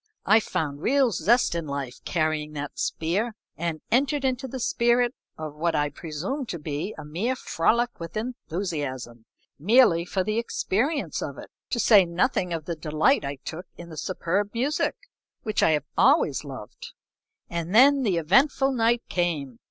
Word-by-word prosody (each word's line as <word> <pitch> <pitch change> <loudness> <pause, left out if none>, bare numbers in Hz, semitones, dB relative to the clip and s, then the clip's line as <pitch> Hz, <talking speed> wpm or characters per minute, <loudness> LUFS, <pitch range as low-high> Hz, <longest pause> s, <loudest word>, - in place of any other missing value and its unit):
I 220 +3 +6
found 155 -8 -3
real 270 +1 +3
zest 215 +5 +2
in 170 -2 -3
life 140 -3 -5
carrying 155 -2 -1
that 145 -1 -6
spear, 205 +8 -1 0.2
and 165 -1 -3
entered 275 +3 +2
into 260 0 -1
the 260 +1 -6
spirit 240 +1 +2 0.2
of 155 -2 -6
what 165 +2 -1
I 145 -1 +1
presumed 175 - -5
to 170 - -3
be 150 +5 -4
a - - -8
mere 190 +13 -1
frolic 235 +3 0
with 170 +5 -6
enthusiasm, 155 - -4 0.3
merely 200 - +5
for 185 +1 -1
the 215 +3 0
experience 245 +5 -1
of - - -5
it, - - -10 0.2
to 240 - -1
say 205 -3 +7
nothing 180 +2 0
of 165 -3 -3
the 170 - -3
delight 155 - +2
I 140 0 -3
took 170 +3 -6
in 170 0 -10
the 160 - -9
superb 195 +5 -2
music, 270 +6 0 0.5
which 215 -2 0
I - - +5
have 150 -2 0
always 140 0 +3
loved. 130 -7 -9 0.5
And 170 +3 -3
then 275 +4 +7
the 200 -8 +1
eventful 270 - +3
night 235 -1 +2
came. 150 -9 -2
180 Hz, 165 wpm, -25 LUFS, 155-235 Hz, 0.5 s, say